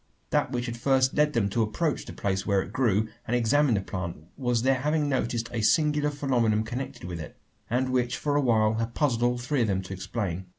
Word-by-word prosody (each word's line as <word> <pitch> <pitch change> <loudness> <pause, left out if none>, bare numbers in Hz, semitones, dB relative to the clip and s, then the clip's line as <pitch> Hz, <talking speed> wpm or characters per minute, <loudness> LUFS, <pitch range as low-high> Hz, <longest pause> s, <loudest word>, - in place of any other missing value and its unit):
That - - +1
which 120 0 -2
had 120 -1 -4
first 130 +1 +2
led 150 0 +2
them 115 -4 +2
to 115 +4 0
approach 140 +9 -1
the - - -8
place 95 -1 -1
where 100 -2 +1
it - - -11
grew, 110 -4 +2 0.2
and 120 - +1
examine 125 +2 +3
the 100 - 0
plant, 90 -3 -5 0.2
was 125 -3 0
their 130 0 +3
having 150 +1 +1
noticed 120 -4 -1
a 115 - -1
singular 150 +4 +3
phenomenon 120 -7 +1
connected 120 +1 -6
with 90 -1 -5
it; 75 - -9 0.3
and 130 +3 +1
which 125 -1 0
for 145 -1 -1
awhile 115 -6 +3
had 115 0 -3
puzzled 130 -6 +1
all 120 0 +2
three 125 +2 -1
of 115 - +2
them 95 -2 0
to 95 - -7
explain. 95 -2 -4
120 Hz, 220 wpm, -27 LUFS, 110-135 Hz, 0.3 s, examine